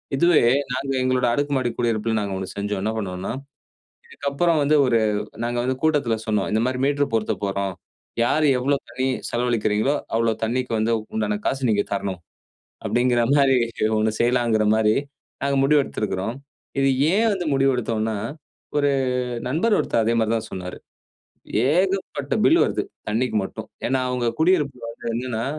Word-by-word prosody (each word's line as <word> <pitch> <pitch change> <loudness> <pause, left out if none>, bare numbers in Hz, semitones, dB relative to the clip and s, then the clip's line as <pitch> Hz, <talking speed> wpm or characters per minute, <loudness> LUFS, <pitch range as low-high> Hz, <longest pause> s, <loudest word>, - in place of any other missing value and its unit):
இதுவே 170 +3 +4 0.3
நாங்க 135 +2 -2
எங்களோட 130 -1 +1
அடுக்குமாடி 140 -3 0
குடியிருப்பில 115 -1 0
நாங்க 100 -1 -3
ஒன்னு 95 - -4
செஞ்சோம். 100 -1 -2
என்ன 110 - 0
பண்ணுவோம்னா? 95 -3 -4 0.8
இதுக்கு 460 - -5
அப்புற 170 +5 +1
வந்து 150 +2 +3
ஒரு 115 -2 +3 0.5
நாங்க 120 0 -1
வந்து 130 0 0
கூட்டத்தில 145 -7 +2
சொன்னோம், 105 -3 0
"இந்த 110 - +2
மாரி 130 0 -1
மீட்டர் 145 -3 +1
பொருத்தப் 110 -1 -1
போறோம். 100 -1 -2 0.5
யார் 155 +5 +2
எவ்வளோ 140 +3 +1
தண்ணீ 130 +2 -3 0.3
செலவழிக்கிறீங்களோ, 120 0 +1 0.2
அவ்வளோ 115 0 +2
தண்ணிக்கு 125 +2 -2
வந்து 110 +2 +1 0.2
உண்டான 105 -1 0
காசு 135 -2 0
நீங்க 100 -1 +2
தரணும்." 95 -3 -2 0.7
அப்படிங்கிற 120 0 +2
மாரி 135 -2 +4 0.4
ஒன்னு 110 0 +1
செய்யலாங்கிற 120 -2 +2
மாரிம் 110 +5 +2 0.4
நாங்க 140 0 +1
முடிவெடுத்திருக்கிறோம். 115 -7 0 0.4
இது 135 0 +3 0.2
ஏன் 225 +2 +3
வந்து 180 -3 -3
முடிவு 135 0 +3
எடுத்தோம்னா? 110 -2 -1 0.6
ஒரு 145 -1 +3 0.6
நண்பர் 185 - +2
ஒருத்தர் 115 - +1
அதே 115 - +2
மாரி 110 -1 +1
தா - - +2
சொன்னாரு. 90 -1 -6 1.0
"ஏகப்பட்ட 185 -6 0
பில் 335 - +5
வருது - - -1 0.3
தண்ணிக்கு 115 +2 0
மட்டும்." - - -8 0.2
ஏனா, 130 +1 +1
அவங்க 125 -1 -1
குடியிருப்பில 150 -8 +2
வந்து 115 - -11
என்னன்னா, 120 -2 -2
120 Hz, 150 wpm, -23 LUFS, 110-140 Hz, 1.0 s, பில்